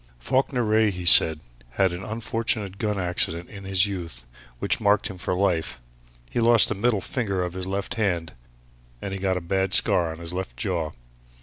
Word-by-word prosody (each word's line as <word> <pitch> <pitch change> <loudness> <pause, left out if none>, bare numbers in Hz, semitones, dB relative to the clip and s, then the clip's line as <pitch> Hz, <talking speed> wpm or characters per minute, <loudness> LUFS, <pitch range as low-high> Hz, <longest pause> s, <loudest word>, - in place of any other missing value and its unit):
"Falkiner 125 - 0
Wraye," 110 0 +2
he 90 -2 -6
said, 80 -2 +7 0.3
"had 95 -2 +1
an 90 +2 -6
unfortunate 110 -3 -3
gun 105 -2 -1
accident 90 -2 0
in 100 -2 -10
his 95 0 +3
youth 85 -12 -6 0.3
which - - -1
marked 100 -1 +2
him 95 - -12
for 90 -1 -2
life. 90 -9 -1 0.5
He - - -1
lost 115 -1 +5
the - - 0
middle 105 0 0
finger 100 -7 -2
of 90 -1 -5
his 95 0 -6
left 100 +4 -3
hand, 90 -8 -2 0.7
and 95 - -6
he 95 - -5
got 95 -1 0
a - - -4
bad 95 +3 0
scar 85 -5 +2
on 80 - -8
his 85 +1 -4
left 90 -10 -5
jaw. 85 -2 -3
95 Hz, 190 wpm, -24 LUFS, 85-105 Hz, 0.7 s, said